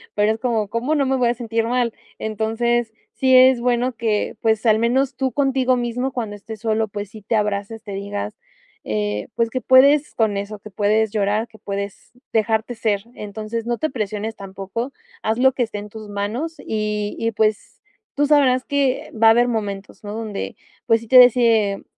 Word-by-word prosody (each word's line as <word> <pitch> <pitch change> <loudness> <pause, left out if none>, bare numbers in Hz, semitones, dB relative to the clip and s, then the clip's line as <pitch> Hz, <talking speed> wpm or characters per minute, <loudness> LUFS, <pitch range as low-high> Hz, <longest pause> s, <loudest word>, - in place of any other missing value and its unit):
pero 210 +1 +3
es 220 - -3
como: 225 -4 0
"¿Cómo 245 +9 -1
no 280 -2 +2
me 265 - +1
voy 250 -2 +2
a 240 - +2
sentir 230 -1 -1
mal?". 240 -1 0 0.2
Entonces 225 +2 -1 0.2
sí, 260 -1 +3
es 255 -1 +6
bueno 245 +1 +1
que, 220 -3 -1
pues, 220 0 +1
al 220 -1 +4
menos 255 +3 +1
tú 260 0 -1
contigo 265 -1 +2
mismo 245 +2 -2
cuando 220 -5 -4
estés 215 +1 -9
solo, 220 -1 0
pues 205 -1 -6
sí 215 -2 -11
te 220 - -1
abraces, 210 +1 -2
te 205 - -8
digas, 150 - -4 0.5
eh, 105 -1 -2
pues, 230 -1 0
que 255 +1 -2
puedes 280 +3 +5
con 220 -3 +1
eso 200 +1 -4
que 210 0 -13
puedes 210 +2 +1
llorar, 210 +2 0
que 220 -2 -18
puedes 200 +1 -6 0.2
dejarte 220 +1 +1
ser. 215 -3 -1
Entonces 220 +2 -5
no 240 - 0
te 315 +2 -2
presiones, 215 -2 -3
tampoco 195 +6 -5 0.3
haz 220 +1 0
lo 265 +1 +5
que 255 -1 -4
esté 225 -2 -5
en 205 +1 -7
tus 215 0 -10
manos 225 +11 -3
y 210 -1 -2
y 230 0 0
pues, 215 -1 -1 0.4
tú 290 0 +2
sabrás 270 -4 +3
que 280 -3 0
va 225 0 +4
a - - +9
haber 240 +2 +4
momentos, 205 -4 -4
¿no? 205 0 -6
Donde, 220 -3 -5 0.3
pues, 225 0 +4
sí 230 - -12
te 255 +1 +8
de 250 - +12
ese 225 -5 +2
225 Hz, 195 wpm, -21 LUFS, 210-245 Hz, 0.5 s, de